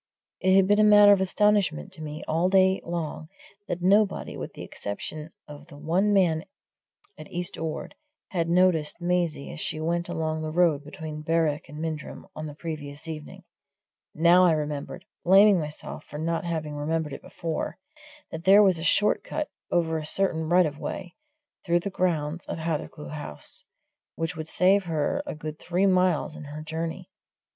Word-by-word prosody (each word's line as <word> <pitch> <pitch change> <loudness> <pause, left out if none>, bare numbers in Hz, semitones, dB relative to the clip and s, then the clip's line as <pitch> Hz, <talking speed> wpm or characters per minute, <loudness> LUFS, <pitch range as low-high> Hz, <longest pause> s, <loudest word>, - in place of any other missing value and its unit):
It 185 0 +3
had 195 -1 +6
been 205 +1 +4
a - - +6
matter 205 -1 +8
of 200 -2 +5
astonishment 190 - +2
to - - -9
me 150 0 -6
all 165 +3 +1
day 190 0 +4
long 165 -2 -4 0.4
that 175 0 -3
nobody, 200 +1 +2
with - - -6
the - - -8
exception 150 +10 -6 0.2
of 145 0 -11
the 150 -4 -13
one 175 +7 +1
man 175 -5 +3 0.7
at - - -11
East 175 0 -3
Ord, 160 -1 -5 0.4
had 170 -3 -1
noticed 175 -4 +3
Maisie 175 -4 -1
as - - -7
she 155 - -1
went 170 +2 -1
along 160 -2 -2
the 155 - -3
road 160 -3 +2
between 155 -1 -7
Berwick 155 -2 0
and 150 - -9
Mindrum 155 -1 -5
on 155 0 -5
the 145 - -9
previous 150 -2 -7
evening 155 -2 -8 0.7
now 170 +3 +6
I 175 -3 +5
remembered, 150 +3 -4 0.2
blaming 195 +1 +6
myself 150 -1 -6
for 150 - -9
not 165 +2 -2
having 160 -3 -3
remembered 150 0 -2
it - - -7
before, 165 -2 -4 0.5
that 160 +1 -6
there 200 +3 +7
was 185 -4 +3
a - - -5
short 205 +5 +3
cut, 305 - -3 0.2
over 165 -2 +1
a 155 - -6
certain 160 -3 0
right 180 +1 +5
of 150 -1 -4
way, 180 -3 -5 0.5
through 175 -1 +2
the 200 - -4
grounds 170 -3 -1
of - - -4
Hathercleugh 160 -2 -4
House, 145 - -4 0.5
which 165 +2 -3
would 160 0 -6
save 190 +4 +3
her 165 - 0
a - - -4
good 155 0 -7
three 180 +2 0
miles 185 -4 +2
in 150 - -9
her 150 +2 -7
journey. 160 +1 -5
165 Hz, 175 wpm, -26 LUFS, 155-180 Hz, 0.7 s, matter